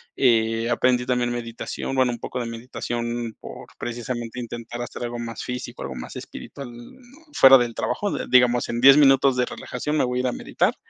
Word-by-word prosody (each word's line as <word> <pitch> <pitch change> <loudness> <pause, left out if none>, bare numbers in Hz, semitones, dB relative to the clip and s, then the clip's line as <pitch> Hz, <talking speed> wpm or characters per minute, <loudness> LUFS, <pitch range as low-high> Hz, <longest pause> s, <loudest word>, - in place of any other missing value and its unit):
Eh, 115 -2 +2
aprendí 125 0 +2
también 125 -1 0
meditación, 120 +2 -5
bueno, 130 -2 +3
un 120 - -6
poco 125 - -5
de 120 - -3
meditación 120 0 -4
por, - - -10
precisamente, 120 0 -5
intentar 120 0 -6
hacer 120 - -6
algo 120 0 -4
más 115 -1 -6
físico, 125 0 -6
algo 65 -1 -6
más - - -8
espiritual, 140 -3 -9
no 245 - -15
fuera 135 - +8
del 120 -2 -1
trabajo, 205 -1 -2 0.2
digamos, 125 -1 +4
en 120 0 -2
10 135 +2 +9
minutos 135 -2 +5
de 125 - +2
relajación 150 +5 -4
me - - +3
voy 125 0 -2
a - - +2
ir 130 - 0
a - - 0
meditar. - - 0
120 Hz, 195 wpm, -23 LUFS, 120-130 Hz, 0.2 s, 10